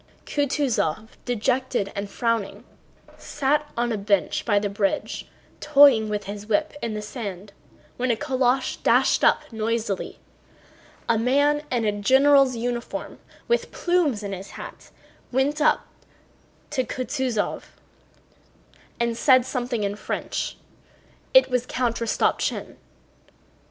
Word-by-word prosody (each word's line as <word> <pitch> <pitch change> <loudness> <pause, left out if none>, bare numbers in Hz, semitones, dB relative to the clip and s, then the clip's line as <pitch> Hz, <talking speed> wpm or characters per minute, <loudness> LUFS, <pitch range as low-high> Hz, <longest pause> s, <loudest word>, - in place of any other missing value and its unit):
Kutúzov, 255 - 0 0.2
dejected 245 -2 0
and 200 0 -4
frowning, 230 -2 -2 0.6
sat 295 +1 0
on 240 0 0
a 215 - -1
bench 200 -1 0
by 205 -3 +2
the 205 0 +1
bridge 200 0 -2 0.3
toying 275 -7 +6
with 210 -1 -2
his 205 +1 -7
whip 310 +8 +1
in 225 -2 -3
the 210 - -4
sand 205 -4 -7 0.4
when 255 +1 -1
a 235 - +3
calèche 260 0 0
dashed - - +3
up - - +4
noisily. 220 -2 -2 0.9
A 230 -2 +2
man 285 +5 +2
in 240 -3 0
a 210 - +2
general's 265 +5 +4
uniform 240 +1 -4 0.3
with 475 - 0
plumes 330 - +1
in 200 -1 -4
his 190 +1 -7
hat - - -10 0.4
went 275 +4 +1
up 305 - +3 0.9
to 265 -4 0
Kutúzov 255 -3 -2 1.3
and 235 -1 0
said 255 0 +4
something 245 -4 -2
in 200 0 -1
French. - - -4 0.7
It - - +6
was 250 0 0
Count 240 -2 -1
Rostopchín. 230 -1 -1
240 Hz, 120 wpm, -24 LUFS, 210-265 Hz, 1.3 s, toying